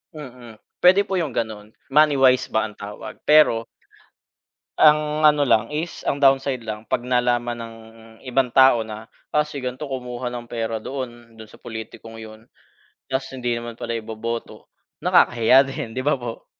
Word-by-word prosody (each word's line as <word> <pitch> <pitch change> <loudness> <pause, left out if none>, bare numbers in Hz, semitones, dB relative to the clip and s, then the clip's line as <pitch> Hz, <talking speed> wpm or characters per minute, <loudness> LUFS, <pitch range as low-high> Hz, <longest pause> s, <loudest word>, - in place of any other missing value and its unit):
Mm, 125 -6 -11 0.2
pwede 185 +3 +6
po 195 -2 -1
yung 160 - -2
ganon, 110 -2 -4 0.2
money 150 -1 +5
wise 130 0 +4
ba 110 0 0
ang 105 -1 -9
tawag. 105 +1 -9
Pero 150 -7 +5 1.1
Ang 150 0 +3
ano 150 -1 +4
lang 110 -4 +2
is, 155 +3 -4
ang 140 - -1
downside 135 -3 +2
lang 105 0 -5
'pag 120 0 -1
nalaman 120 -1 +1
ng 115 0 -9 0.5
ibang 130 0 +1
tao 130 -2 +5
na, 110 0 -9 0.4
"Si 145 -3 -7
ganito 125 +4 -5
kumuha 125 -2 -5
ng 120 -1 -8
pera 115 -1 -3
doon 120 -4 -8
doon 110 - -10
sa - - -19
politikong 115 0 -9
'yon." 110 0 -12 0.5
Tas 135 0 -3
hindi 125 -2 -3
naman 120 0 -5
pala 115 - -5
iboboto 115 +1 -6 0.3
nakakahiya 125 +3 +4
din, 115 -4 -6
'di 130 - -3
ba 145 +3 +1
po? 120 -3 -7
120 Hz, 160 wpm, -22 LUFS, 115-135 Hz, 1.1 s, pwede